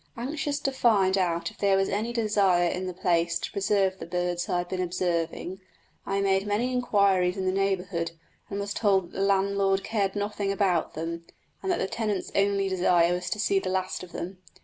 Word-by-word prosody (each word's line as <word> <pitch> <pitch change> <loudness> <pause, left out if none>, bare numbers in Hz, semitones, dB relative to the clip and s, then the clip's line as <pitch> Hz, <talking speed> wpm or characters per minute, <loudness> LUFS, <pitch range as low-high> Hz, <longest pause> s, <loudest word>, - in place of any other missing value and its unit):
Anxious 285 +3 -2
to 275 - 0
find 205 -7 +3
out 170 -3 0
if - - -21
there 200 -1 +3
was 195 0 +2
any 215 +4 -1
desire 200 -6 +2
in 185 +2 -2
the - - -2
place 170 -2 +1
to - - -5
preserve 195 -1 +1
the - - -7
birds 175 0 -2
I 180 - +1
had 175 0 -3
been 185 -1 -2
observing, 175 0 -2 0.5
I 195 0 0
made 195 0 +1
many 220 +5 0
inquiries 200 -6 +2
in 190 - -2
the 185 - +2
neighbourhood, 190 -3 -1 0.4
and 200 - -3
was 200 0 -3
told 195 -5 +1
that - - -10
the - - -1
landlord 195 0 +2
cared 200 -3 -1
nothing 205 -1 -1
about 190 -5 +1
them, 165 +1 -5 0.3
and 385 - -1
that 350 - +1
the - - 0
tenant's 210 -3 -2
only 200 0 +2
desire 175 -2 +3
was 180 0 -3
to 210 - -2
see 200 -1 +2
the 190 - -4
last 185 0 -2
of 180 -2 -10
them. 180 +2 -6
195 Hz, 205 wpm, -27 LUFS, 180-200 Hz, 0.5 s, find